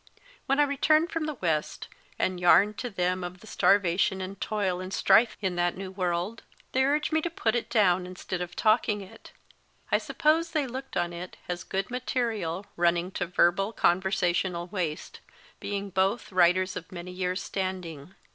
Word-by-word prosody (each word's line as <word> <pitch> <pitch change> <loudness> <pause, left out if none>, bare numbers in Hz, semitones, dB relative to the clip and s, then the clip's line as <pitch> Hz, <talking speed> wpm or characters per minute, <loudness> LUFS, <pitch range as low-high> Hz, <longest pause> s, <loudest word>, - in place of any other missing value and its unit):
When 275 +2 +2
I - - +7
returned 310 +3 +2
from 325 -1 -2
the 305 - -3
West, 160 -8 -2 0.3
and 185 -1 -1
yarned 195 +4 +5
to 245 - -3
them 185 -2 -1
of 180 +1 -6
starvation 190 -2 +2
and 190 +1 -6
toil 200 -4 -1
and 185 0 -6
strife 220 +4 +4
in 190 -3 -1
that 175 0 +1
new 190 0 -6
world, 185 +3 -2 0.3
they 265 - +2
urged 295 +3 +1
me 315 - +3
to 345 - -2
put 230 -9 0
it 240 - -2
down 185 -4 +3
instead 185 0 -5
of 180 - -5
talking 215 -1 +2
it. 190 - -13 0.6
I - - +4
suppose 325 +2 +1
they 305 -3 +1
looked 265 +2 -6
on 175 0 -1
it 175 +2 -8
as 175 -1 -4
good 195 +6 -3
material 225 -8 -2
running 175 +1 +1
to 180 - -3
verbal 185 +4 +2
conversational 180 -2 +1
waste, 175 -5 -4 0.4
being 200 -1 -4
both 195 +6 0
writers 185 +1 +3
of 165 - -7
many 180 0 -7
years 180 0 -2
standing. 185 -4 -5
190 Hz, 170 wpm, -28 LUFS, 180-225 Hz, 0.6 s, I